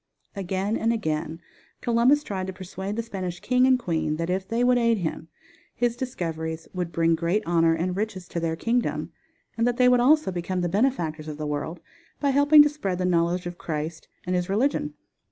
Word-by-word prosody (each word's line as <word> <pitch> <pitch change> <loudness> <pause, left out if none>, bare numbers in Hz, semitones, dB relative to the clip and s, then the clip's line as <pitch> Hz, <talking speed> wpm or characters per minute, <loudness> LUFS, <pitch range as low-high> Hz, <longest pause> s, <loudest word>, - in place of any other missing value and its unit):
Again 195 +2 -1
and 230 - +1
again 160 -6 -2 0.4
Columbus 245 +5 +3
tried 190 -7 -4
to 190 - -5
persuade 190 +2 -6
the 230 - -2
Spanish 185 -5 -5
king 250 0 +3
and 260 -1 +5
queen 165 -9 -1
that 165 +2 -2
if 190 +1 -2
they 230 +2 0
would 245 0 +4
aid 230 -1 +3
him, 165 -3 -4 0.5
his 240 -1 0
discoveries 165 -10 -4
would 180 -2 -3
bring 165 +1 +2
great 170 +6 0
honor 165 -1 +3
and 180 +2 -2
riches 200 -3 -3
to 170 - -3
their 165 -1 -1
kingdom, 235 +7 -1 0.5
and 230 - +3
that 240 -1 0
they 250 -1 +5
would 250 0 +5
also 300 -1 +4
become 180 +1 -2
the 175 - 0
benefactors 170 - 0
of 150 -1 -6
the 155 - -4
world 150 +3 -4 0.4
by 280 -1 +2
helping 290 +2 +7
to - - +3
spread 200 -12 -3
the 180 - -1
knowledge 175 0 +1
of 175 0 -6
Christ 155 0 -4 0.2
and 180 +1 -1
His 180 0 -1
religion. 200 - 0
185 Hz, 200 wpm, -25 LUFS, 165-235 Hz, 0.5 s, helping